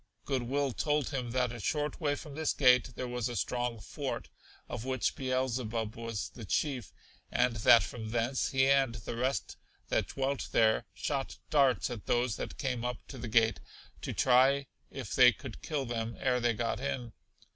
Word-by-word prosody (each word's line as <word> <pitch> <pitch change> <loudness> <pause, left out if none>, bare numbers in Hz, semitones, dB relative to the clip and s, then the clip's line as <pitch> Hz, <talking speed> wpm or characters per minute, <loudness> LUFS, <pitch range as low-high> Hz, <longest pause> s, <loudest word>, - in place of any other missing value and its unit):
Good 135 -3 0
will 135 +3 0
told 150 +2 0
him 125 -4 -3
that 125 0 +1
a 120 - -7
short 150 - -1
way 145 -2 +1
from 145 0 -9
this 155 +1 0
gate 125 -3 +5
there 125 - -3
was 125 -1 -2
a 120 - -5
strong 120 -1 -1
fort, - - -5 0.4
of 120 -2 -5
which 130 -1 0
Beelzebub 125 -4 -1
was 115 -2 -4
the 115 - -10
chief, 125 - -1 0.4
and 120 -2 +2
that 115 +2 +7
from 110 -2 -6
thence 120 +3 0
he 135 0 +3
and 135 -3 +3
the 115 0 -5
rest 130 +3 -1 0.3
that - - +1
dwelt 135 0 -2
there 110 -2 +3
shot 135 +6 -2
darts 135 -4 +3
at 115 -4 -7
those 120 -2 +1
that - - -5
came 125 -4 -2
up 125 -1 -2
to 130 - -8
the 120 - -5
gate 110 0 +3 0.4
to - - -3
try 135 +2 +4 0.2
if 130 -7 -6
they 125 -1 +8
could 130 -3 -9
kill 145 -4 -2
them 115 -1 -3
ere 125 -2 +2
they 120 -1 +2
got 115 +2 -1
in. 125 -4 -3
125 Hz, 185 wpm, -31 LUFS, 115-135 Hz, 0.4 s, they